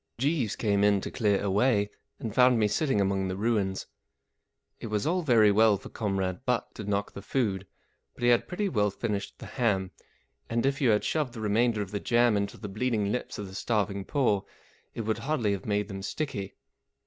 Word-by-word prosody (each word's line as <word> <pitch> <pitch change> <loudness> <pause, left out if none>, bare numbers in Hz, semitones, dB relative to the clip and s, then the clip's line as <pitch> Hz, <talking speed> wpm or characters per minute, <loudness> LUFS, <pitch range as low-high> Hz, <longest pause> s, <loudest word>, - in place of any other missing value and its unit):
Jeeves 135 -4 0
came 100 -2 +1
in 105 -1 +4
to - - -5
clear 105 -5 +2
away, 105 +1 +2 0.3
and 110 -3 -5
found 125 0 +5
me 110 -2 +3
sitting 135 +1 +1
among 95 -1 +1
the 95 0 -3
ruins. 100 -3 0 0.9
It - - -6
was 105 -1 -1
all 180 +4 +1
very 115 -9 +5
well 110 0 +5
for - - -11
Comrade 95 -1 -2
Butt 125 -2 -1
to 110 - -7
knock 100 0 -1
the 100 - -8
food, 100 -4 -1 0.5
but - - -9
he 120 - +5
had 120 -1 +3
pretty 200 +3 -1
well 105 - +1
finished 100 0 -4
the - - -10
ham; 100 -7 0 0.6
and 115 +2 0
if 135 +1 0
you 130 - +4
had 105 -1 +3
shoved 150 -6 -1
the 115 - -8
remainder 110 +1 +2
of 95 - -10
the 105 - -2
jam 120 -1 +3
into 100 0 -2
the 105 - -7
bleeding 105 0 -1
lips 125 - -3
of 105 - -5
the 95 - -11
starving 100 -2 -1
poor 105 -5 +1 0.5
it - - -3
would 110 0 -1
hardly 135 -8 0
have 100 +1 -3
made 105 -1 0
them 95 -2 -6
sticky. 100 -3 -4
105 Hz, 205 wpm, -28 LUFS, 100-120 Hz, 0.9 s, found